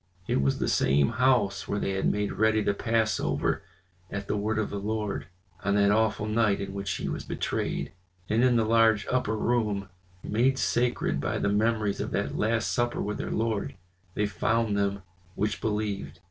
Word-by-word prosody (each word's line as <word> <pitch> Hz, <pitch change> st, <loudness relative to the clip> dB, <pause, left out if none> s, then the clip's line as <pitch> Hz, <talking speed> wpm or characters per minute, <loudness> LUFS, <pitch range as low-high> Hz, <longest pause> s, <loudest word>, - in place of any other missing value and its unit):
It -, -, +1 dB
was 70 Hz, 0 st, +1 dB
the -, -, -1 dB
same 70 Hz, +1 st, +3 dB
house 120 Hz, -5 st, +2 dB
where 100 Hz, -, -1 dB
they 100 Hz, -, -1 dB
had 95 Hz, 0 st, +1 dB
made 105 Hz, 0 st, -1 dB
ready 110 Hz, 0 st, +2 dB
the 100 Hz, -, +1 dB
Passover 110 Hz, +1 st, 0 dB, 0.5 s
at 100 Hz, 0 st, -5 dB
the -, -, 0 dB
word 105 Hz, +1 st, -1 dB
of 110 Hz, -, -1 dB
the 100 Hz, -, -3 dB
Lord, 105 Hz, -7 st, -3 dB, 0.4 s
on 100 Hz, +1 st, +1 dB
that 100 Hz, 0 st, +4 dB
awful 110 Hz, 0 st, +2 dB
night 110 Hz, -1 st, +2 dB
in 100 Hz, -1 st, -5 dB
which 100 Hz, 0 st, -4 dB
he -, -, -3 dB
was -, -, -3 dB
betrayed. -, -, -2 dB, 0.4 s
And 110 Hz, +4 st, +2 dB
in 125 Hz, -1 st, +4 dB
the 115 Hz, -1 st, +3 dB
large 110 Hz, -1 st, +4 dB
upper 125 Hz, -4 st, 0 dB
room, 105 Hz, -5 st, 0 dB, 0.3 s
made 125 Hz, +5 st, +2 dB
sacred 120 Hz, 0 st, 0 dB
by -, -, -1 dB
the 100 Hz, -, 0 dB
memories 105 Hz, 0 st, +1 dB
of -, -, -3 dB
that -, -, -1 dB
last 110 Hz, +1 st, +1 dB
supper 120 Hz, 0 st, 0 dB
with 105 Hz, +1 st, -2 dB
their -, -, -3 dB
Lord, 110 Hz, -2 st, -1 dB, 0.4 s
they 105 Hz, -, +1 dB
found 110 Hz, +1 st, 0 dB
them 100 Hz, -1 st, 0 dB, 0.3 s
which 105 Hz, +2 st, -1 dB
believed. 105 Hz, -3 st, -2 dB
105 Hz, 185 wpm, -28 LUFS, 100-115 Hz, 0.5 s, that